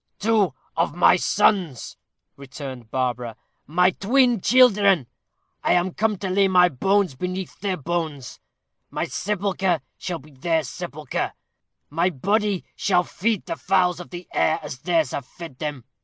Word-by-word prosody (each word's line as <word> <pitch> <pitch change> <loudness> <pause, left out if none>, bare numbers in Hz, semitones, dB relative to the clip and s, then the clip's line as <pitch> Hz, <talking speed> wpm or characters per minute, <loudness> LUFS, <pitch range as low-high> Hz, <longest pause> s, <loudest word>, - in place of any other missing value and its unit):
"Two 205 -8 +2 0.2
of - - 0
my - - +6
sons," 175 - +1 0.4
returned 135 -4 -9
Barbara; 125 -2 -2 0.3
"my 180 +4 +3
twin 240 +3 +2
children. 205 - +5 0.6
I - - +3
am 180 0 +1
come 215 0 0
to 190 0 -4
lay 195 +1 +4
my 180 -1 +5
bones 190 +5 +1
beneath 180 +6 -5
their 195 -2 -2
bones 155 -4 -4 0.5
my - - -2
sepulchre 190 -3 -1 0.2
shall 180 -2 -3
be 150 0 -16
their 160 +4 0
sepulchre; 150 0 -4 0.6
my 170 +4 +2
body 200 - 0
shall 180 -3 +2
feed 210 +3 -1
the - - -3
fowls 180 -1 +1
of 175 - -9
the 175 0 -8
air 160 +1 +2
as 140 -4 -7
theirs 165 -3 +1
have 135 -3 -5
fed 165 -8 -11
them. 145 -6 -4
180 Hz, 145 wpm, -23 LUFS, 150-195 Hz, 0.6 s, my